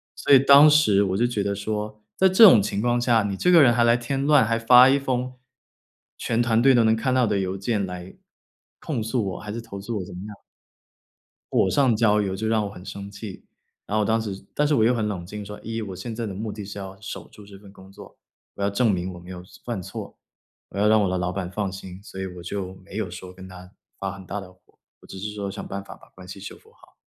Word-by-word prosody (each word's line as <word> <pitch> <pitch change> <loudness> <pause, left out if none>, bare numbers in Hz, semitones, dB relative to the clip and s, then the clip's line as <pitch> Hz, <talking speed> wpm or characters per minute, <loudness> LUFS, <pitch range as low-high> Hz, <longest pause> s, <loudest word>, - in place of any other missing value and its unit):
所 - - -2
以 135 - +9
当 140 +3 +8
时 110 -10 +4
我 95 -1 -1
就 120 - +2
觉 110 -5 -2
得 100 - -1
说， 105 +1 -4 0.2
在 190 0 +5
这 205 +5 +8
种 105 - +6
情 100 - -3
况 120 0 +1
下， 115 -3 +3
你 100 -1 -2
这 180 - +2
个 170 -3 +8
人 120 -3 +5
还 120 - +3
来 115 0 +4
添 135 +3 -3
乱， 145 -4 +5
还 115 +1 0
发 125 +2 +7
一 135 - +4
封 130 -1 -2 0.8
全 115 +1 -1
团 115 -1 +2
队 135 +1 +6
都 120 - +4
能 110 0 +4
看 130 +3 -1
到 130 -2 +3
的 105 -2 0
邮 95 0 -3
件 100 0 -1
来 90 0 -8 0.6
控 130 -8 -3
诉 110 -4 -1
我， - - -7
还 105 - -7
是 115 - -5
投 100 -4 -9
诉 110 0 -4
我 90 - -5
怎 - - -11
么 90 - -7
样 105 -2 -11 1.1
火 95 - +3
上 130 -3 +3
浇 105 -1 +3
油， 95 -2 -2
就 110 - -3
让 110 -1 +1
我 - - -6
很 90 -2 -12
生 100 0 -8
气。 100 -1 -9 0.4
然 105 - -2
后 105 - +2
当 110 +2 +1
时 100 -3 -6
但 150 0 +1
是 150 - +2
我 110 - +3
又 120 +2 +3
很 110 -3 -1
冷 95 -4 -4
静 105 +3 -8
说， 105 +1 -9
一， 115 0 -4
我 95 -4 -6
现 110 +5 -6
在 115 0 -4
的 100 - -5
目 105 +2 -5
的 105 -2 -7
是 100 +1 -8
要 95 0 -8
守 110 - -7
住 105 - -15
这 100 -1 -13
份 100 -1 -16
工 95 -1 -16
作， - - -14 0.4
我 - - -7
要 100 - +2
证 105 +2 +2
明 90 +1 -3
我 - - -10
没 90 +1 -13
有 90 -1 -8
错 90 - -18
犯 120 -5 -4
错， - - -9 0.5
我 - - -8
要 105 - +3
让 110 -1 +4
我 95 - +1
的 95 - -1
老 90 0 -2
板 90 -2 -4
放 100 -1 -3
心。 95 0 -10
所 95 -3 -9
以 95 - -3
我 90 -1 -9
就 95 +1 -5
没 95 - -14
有 105 -5 -3
说 90 +1 -9
跟 95 0 -12
他 90 0 -12 0.3
发 95 -1 -3
很 95 -2 -11
大 100 +3 -4
的 90 -1 -12
火， 90 - -30 0.4
我 - - -18
只 95 - -10
是 105 +2 -5
说 100 -2 -4
想 - - -7
办 100 0 -5
法 - - -12
把 - - -20
关 95 -1 -14
系 95 - -8
修 100 - -9
复 445 - -23
好。 - - -23
105 Hz, 290 characters per minute, -24 LUFS, 95-115 Hz, 1.1 s, 以